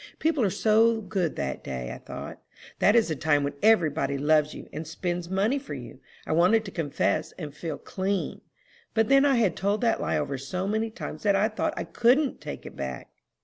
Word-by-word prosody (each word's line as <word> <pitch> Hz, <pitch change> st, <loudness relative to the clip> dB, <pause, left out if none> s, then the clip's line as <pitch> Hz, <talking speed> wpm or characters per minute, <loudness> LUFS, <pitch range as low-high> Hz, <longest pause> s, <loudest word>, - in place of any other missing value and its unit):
People 310 Hz, -5 st, +1 dB
are 200 Hz, -, +3 dB
so 220 Hz, +3 st, +3 dB
good 190 Hz, -5 st, -2 dB
that 65 Hz, -1 st, -3 dB
day, 65 Hz, -2 st, -5 dB
I -, -, -9 dB
thought. -, -, -8 dB, 0.4 s
That 205 Hz, -, +5 dB
is 225 Hz, -6 st, +4 dB
the 155 Hz, -, -1 dB
time 145 Hz, 0 st, +2 dB
when 140 Hz, -, -2 dB
every 210 Hz, -8 st, +5 dB
body 140 Hz, -2 st, -1 dB
loves 150 Hz, +1 st, +2 dB
you, -, -, -9 dB
and 155 Hz, +1 st, -5 dB
spends 175 Hz, +1 st, -3 dB
money 205 Hz, +9 st, +1 dB
for 270 Hz, -, -7 dB
you. 130 Hz, +1 st, -9 dB, 0.3 s
I -, -, -4 dB
wanted 180 Hz, +7 st, +4 dB
to 195 Hz, -, -6 dB
confess, 155 Hz, -1 st, -1 dB
and 150 Hz, -5 st, -7 dB
feel 155 Hz, 0 st, -5 dB
clean; 190 Hz, 0 st, -3 dB, 0.5 s
but 225 Hz, +1 st, +2 dB
then 275 Hz, +1 st, +6 dB
I 275 Hz, -2 st, +4 dB
had 215 Hz, -8 st, +2 dB
told 200 Hz, +3 st, 0 dB
that 230 Hz, -2 st, +2 dB
lie -, -, 0 dB
over 140 Hz, -1 st, -2 dB
so 180 Hz, +8 st, -3 dB
many 220 Hz, +2 st, 0 dB
times 220 Hz, -, -7 dB
that 200 Hz, -2 st, +3 dB
I 205 Hz, +3 st, +3 dB
thought 305 Hz, +9 st, -2 dB
I -, -, -1 dB
couldn't 255 Hz, +4 st, +2 dB
take -, -, -7 dB
it -, -, -9 dB
back." 65 Hz, -2 st, -5 dB
190 Hz, 215 wpm, -27 LUFS, 150-225 Hz, 0.5 s, then